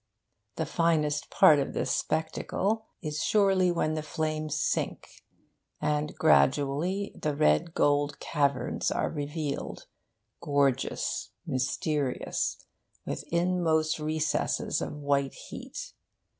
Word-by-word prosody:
The - - -1
finest 155 -3 +1
part 150 -2 +6
of 135 - -2
this - - 0
spectacle 195 +7 -1 0.2
is 150 -1 -2
surely 195 -3 +3
when 155 -2 0
the 155 - -2
flames 155 -1 -2
sink, - - -2 0.6
and 150 0 -1
gradually 155 +6 +2
the 150 -2 -2
red 75 - +2
gold 145 0 +2
caverns 140 -3 0
are - - -1
revealed, 150 -1 -4 0.6
gorgeous, 140 -2 0 0.2
mysterious, 135 +1 -1 0.4
with - - -4
inmost 170 -3 +1
recesses 155 0 0
of - - -4
white 140 -1 0
heat. - - -8
155 Hz, 100 wpm, -29 LUFS, 145-165 Hz, 0.6 s, part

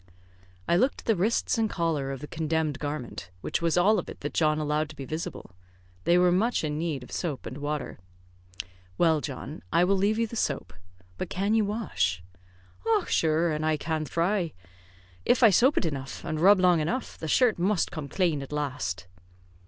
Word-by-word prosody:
I 170 - +3
looked 260 +8 +1
at - - -25
the 225 - +3
wrists 220 +5 +1
and 220 -1 +2
collar 160 -7 -1
of 135 -1 -6
the 150 - -6
condemned 160 -2 -1
garment, 145 - -5
which - - -2
was 170 0 +1
all 205 +4 +4
of - - -6
it - - -10
that 145 - -4
John 155 -2 +2
allowed 150 0 0
to 155 - -11
be 140 - -7
visible. 155 - -5 0.5
They 175 - +5
were 180 0 +5
much 215 +5 +1
in 150 -1 -2
need 155 -6 -2
of - - -13
soap 155 -7 -3
and 135 - -6
water. 145 -6 -4 1.0
"Well, 160 -3 +3
John, 140 +2 -6
I 170 - +4
will 195 +2 +3
leave 200 +3 +2
you 230 - +2
the 230 - -8
soap, 150 - -2 0.5
but - - -3
can 200 +3 0
you 220 -2 +3
wash?" 95 - -1 0.7
"Och, 415 - -1
shure, 160 +1 +2
an' 155 0 -2
I 155 0 +2
can 160 0 -2
thry. 170 +3 0 0.7
If 250 - +3
I 225 - +8
soap 255 +9 +4
it - - +2
enough, 140 -4 -4
and 155 - -2
rub 195 +4 +6
long 180 -2 +4
enough, 230 +12 -2
the 160 - -4
shirt 230 +3 +3
must 190 +1 +1
come 150 -4 -6
clane 170 -5 +1
at 135 - -8
last." 115 -12 -3
160 Hz, 200 wpm, -27 LUFS, 150-195 Hz, 1.0 s, I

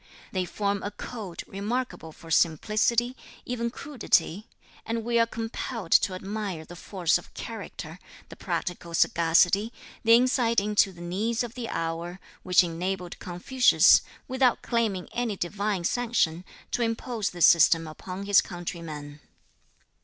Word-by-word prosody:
They 185 -2 -1
form 200 +3 -2
a 205 - -3
code 205 -6 -7
remarkable 205 -3 -4
for 165 +1 -13
simplicity, 215 - +2 0.3
even 235 -1 -2
crudity, 230 - 0 0.4
and 230 0 -3
we 235 0 +1
are 230 - +4
compelled 225 -3 -5
to 185 - +4
admire 195 -4 -5
the 175 - -11
force 175 -1 0
of - - -16
character, - - -7 0.3
the - - -10
practical 170 -1 -4
sagacity, 175 +7 +3 0.3
the 230 0 +7
insight 240 -2 +3
into 205 -1 +2
the 175 -2 -13
needs 215 +7 -1
of 235 -1 -6
the 245 -2 -5
hour, 165 +2 -3 0.2
which 180 0 +5
enabled 180 +1 -4
Confucius, 205 +8 +4 0.3
without 260 -2 +2
claiming 220 -7 -1
any 235 -4 -2
Divine 200 +1 -2
sanction, 185 -6 0 0.3
to - - -1
impose 230 -1 -1
this 175 -1 +3
system 165 0 +6
upon 185 +5 -7
his 200 0 +6
countrymen. 160 -4 -7
200 Hz, 135 wpm, -27 LUFS, 175-230 Hz, 0.4 s, the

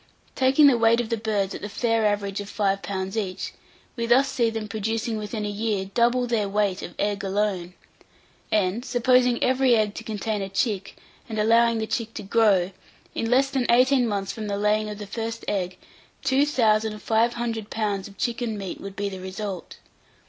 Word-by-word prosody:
Taking 265 +3 +4
the 260 -4 +6
weight 225 +1 +4
of 240 -2 -2
the 230 - +1
birds 210 -3 -1
at - - -7
the 205 - -5
fair 225 0 +1
average 205 -1 -1
of 200 - -8
five 195 -2 0
pounds 190 0 -4
each, 195 -4 -3 0.4
we 235 -2 -2
thus 260 +4 +5
see 235 -3 +1
them 225 -1 -4
producing 220 +2 -2
within 210 0 -4
a - - -1
year 205 -1 -1
double 240 +2 +3
their 225 -4 0
weight 200 -2 0
of 175 - -8
egg 205 -1 -1
alone; 190 -3 -1 0.8
and, 205 +2 +1
supposing 250 -1 +3
every 255 -1 +4
egg 215 -2 +1
to 225 - -7
contain 215 -1 -3
a 195 - -4
chick, 200 -1 -1 0.3
and 220 - -4
allowing 230 +2 +4
the 220 - -1
chick 225 0 -3
to, - - -5
grow, 195 -3 +3 0.4
in 225 - -2
less 270 +3 +3
than 265 -3 -1
eighteen 255 +1 +4
months 200 -2 -2
from 220 -2 -6
the 200 -1 -2
laying 210 +1 +1
of 210 - -6
the 210 - -7
first 225 +2 -5
egg, 185 -3 -2 0.5
two 275 +2 +3
thousand 220 -5 +2
five 230 +2 +2
hundred 225 -3 -3
pounds 205 -3 -2
of 200 -1 -15
chicken 235 -2 -2
meat 195 -2 -6
would 195 0 -7
be 200 0 -2
the 190 -1 -6
result. 190 -1 -6
215 Hz, 195 wpm, -25 LUFS, 200-235 Hz, 0.8 s, the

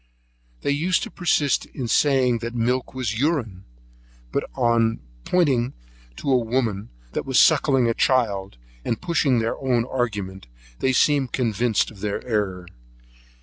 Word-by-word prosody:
They - - 0
used 165 +6 +1
to 230 - -6
persist 155 -6 +1
in 130 -4 -5
saying 130 -2 +3
that 120 +1 -5
milk 125 +3 -1
was 115 -4 -2
urine; 125 - -1 0.7
but - - 0
on 115 -1 +2 0.3
pointing 135 -9 +1 0.4
to 135 - -2
a 130 - +5
woman 115 -3 -1 0.2
that - - -3
was 130 -2 +2
suckling 140 -5 +4
her 115 - +2
child, 100 - 0 0.3
and 115 - -2
pushing 155 -7 +1
their 115 0 -1
own 125 -3 +1
argument, 100 - -3 0.3
they 130 - +2
seemed 135 -1 +2
convinced 115 -2 +1
of 105 - -15
their 100 0 -3
error. 100 -6 -2
120 Hz, 145 wpm, -23 LUFS, 110-135 Hz, 0.7 s, a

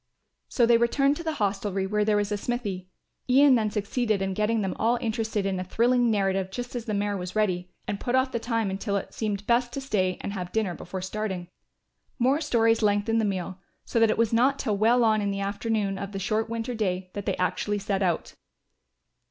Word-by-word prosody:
So 240 - +3
they 230 0 +5
returned 275 +4 +2
to 335 - -6
the 320 -1 -1
hostelry 200 -3 -1
where 210 +2 +1
there 210 0 +2
was 205 0 -1
a - - +1
smithy. 200 -5 -3 0.4
Ian 275 +2 +6
then 220 -3 +2
succeeded 215 +1 -1
in 195 0 -1
getting 215 +3 +1
them 190 -2 -2
all 235 +2 +2
interested 220 -3 -1
in 190 -1 -1
a - - -2
thrilling 240 +5 +2
narrative 195 -3 +1
just 245 +5 -6
as 240 -2 -4
the 215 -3 -2
mare 205 0 0
was 180 0 -5
ready, 185 -4 0 0.2
and 200 - -2
put 245 - -1
off 260 0 +2
the 235 - -1
time 230 -4 -1
until 200 +1 -1
it - - -6
seemed 205 -2 -3
best 240 +2 +2
to 275 - -3
stay 190 -9 0
and 200 - -4
have 180 -3 -5
dinner 215 -5 0
before 180 +2 -6
starting. 190 -3 -4 0.7
More 270 +4 +2
stories 230 -6 +2
lengthened 210 +2 +2
the - - +1
meal, 190 -2 -3 0.3
so 230 - 0
that 225 -1 +5
it - - +1
was 230 0 +2
not 260 +4 +3
till 220 -7 -1
well 230 +4 +4
on 215 -1 +3
in 200 - 0
the 200 0 -2
afternoon 200 0 -1
of 200 0 -6
the - - -3
short 215 +3 -1
winter 230 +1 -3
day 185 -4 -2
that 205 0 -6
they 195 - 0
actually 205 +3 0
set 200 -1 -2
out. 175 -3 0
210 Hz, 220 wpm, -26 LUFS, 195-230 Hz, 0.7 s, Ian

